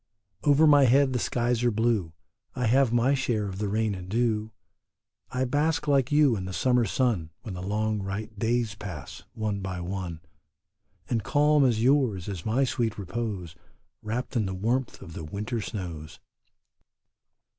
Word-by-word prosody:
Over 145 +2 +5
my 145 -2 +7
head 130 +2 +4
the 125 - 0
skies 120 0 0
are 120 - +4
blue; 110 -7 0 0.4
I 125 -1 -1
have 130 +1 +4
my 120 +3 +3
share 120 -6 0
of 95 0 -6
the 105 -1 -1
rain 110 0 0
and 90 -1 -7
dew; 110 -1 0 0.8
I 130 +1 -1
bask 150 +4 0
like 140 -1 +2
you 145 -4 +5
in 95 -3 -4
the 95 - -5
summer 125 +2 +2
sun 105 -7 0
When 110 -6 -6
the 90 - -6
long 105 +2 -1
bright 100 +2 -5
days 115 -1 0
pass, 90 -9 -8
one 110 -3 -2
by 95 -2 -4
one, 90 -2 -5 0.9
And 115 -2 0
calm 150 +2 +3
as 115 -4 +2
yours 125 -9 +2
is 95 -2 -5
my 120 +5 +2
sweet 120 -4 -1
repose 100 -3 -4 0.5
Wrapped 115 +5 -4
in 110 -4 +1
the 95 - -4
warmth 120 +7 -1
of 85 - -10
the 80 - -6
winter 105 +8 -4
snows. 85 -8 -6
110 Hz, 165 wpm, -27 LUFS, 100-125 Hz, 0.9 s, my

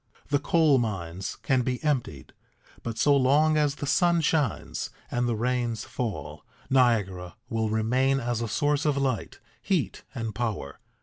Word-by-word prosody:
The 145 - +2
coal 155 -5 +4
mines 95 -4 -3
can 130 -1 +2
be 125 0 -1
emptied, 125 - -2 0.5
but 115 -1 -5
so 145 +5 +4
long 145 +4 +4
as 150 -2 +2
the 145 - -5
sun 170 +3 +3
shines 150 - -1 0.2
and 120 0 0
the 115 - 0
rains 120 0 -1
fall, 75 - -5 0.3
Niagara 105 -9 +2
will 110 -1 0
remain 125 +5 +2
as 120 -2 -2
a 115 - -1
source 145 +7 +1
of 145 -2 +2
light, 135 -4 -1 0.2
heat, - - -1
and 115 -2 -3
power. 105 - -3
120 Hz, 150 wpm, -27 LUFS, 110-140 Hz, 0.5 s, coal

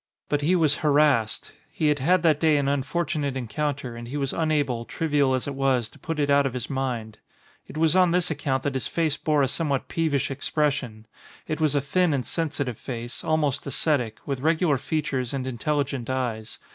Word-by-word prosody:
But 145 -1 +1
he 170 +6 +3
was 155 -4 +3
harassed. 145 -7 +2 0.2
He 155 - 0
had 145 -1 +1
had 175 +6 +3
that 155 -3 +4
day 155 -2 +4
an 140 -1 0
unfortunate 140 0 -1
encounter 130 +1 -3
and 120 0 -8
he 140 +5 -4
was 135 -2 -1
unable, 145 -7 0
trivial 145 -2 +1
as 130 - -2
it 140 - -3
was, 130 -4 +1
to - - -19
put 165 -1 -4
it 145 -1 +1
out 140 -1 +4
of 130 - -5
his 125 +1 -4
mind. 120 -5 -3 0.5
It - - -9
was 160 +1 +3
on 185 -1 +5
this 180 0 +1
account 140 -3 -1
that 145 - -1
his 130 -4 -2
face 160 -3 0
bore 150 -3 +1
a - - +3
somewhat 140 -1 -1
peevish 145 -4 0
expression. 135 -5 -1 0.4
It 155 0 -3
was 150 -2 +2
a 145 - +3
thin 160 +3 +2
and 130 - -2
sensitive 145 -7 -2
face, 120 -1 -6
al 155 - +2
most 145 -2 -1
ascetic, 130 -6 0
with 135 -2 -2
regular 160 0 +2
features 135 -2 -2
and 130 -1 -3
intelligent 135 0 -2
eyes. 120 -4 -3
140 Hz, 200 wpm, -25 LUFS, 130-155 Hz, 0.5 s, on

